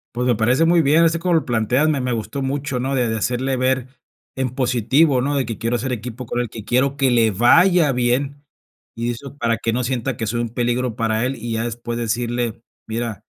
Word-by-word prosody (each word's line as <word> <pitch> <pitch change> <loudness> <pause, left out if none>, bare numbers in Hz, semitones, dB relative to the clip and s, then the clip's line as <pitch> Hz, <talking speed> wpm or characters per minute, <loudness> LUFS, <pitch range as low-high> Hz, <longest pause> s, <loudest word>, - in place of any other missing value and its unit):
Pues, 125 +1 -1
me 125 -2 +3
parece 125 +9 +2
muy 170 0 +4
bien, 155 +3 +4
así 165 0 +2
como 175 0 +1
lo 160 - +1
planteas, 120 +5 +1
me 145 -4 +1
me 125 -1 -1
gustó 115 +5 -4
mucho, 135 -1 -2
¿no? 135 +2 -1
De 125 -2 +1
de 110 - -1
hacerle 130 +4 -1
ver 130 0 0 0.5
en 130 -1 -1
positivo, 130 +3 +2
¿no? 145 +2 -1
De 135 - +1
que 115 -1 -6
quiero 115 +1 -1
hacer 125 +2 -2
equipo 125 +2 -6
con 120 - -3
él, 120 -3 -2
que 110 -2 -9
quiero 135 +3 +1
que 135 -3 +2
le 115 -2 +4
vaya 155 - +4
bien, 135 +3 -1 0.5
y 120 +1 -2
eso 140 +4 -9
para 115 -3 0
que 115 - -1
no 125 +2 -1
sienta 125 -1 -2
que 115 - -2
soy 120 +2 -1
un 115 - -3
peligro 120 0 -1
para 115 -1 0
él, 135 - -3
y 115 0 -5
ya 115 0 -1
después 120 0 -4
decirle: 120 0 -2 0.2
"Mira, 115 -1 -4
125 Hz, 230 wpm, -20 LUFS, 115-135 Hz, 0.5 s, muy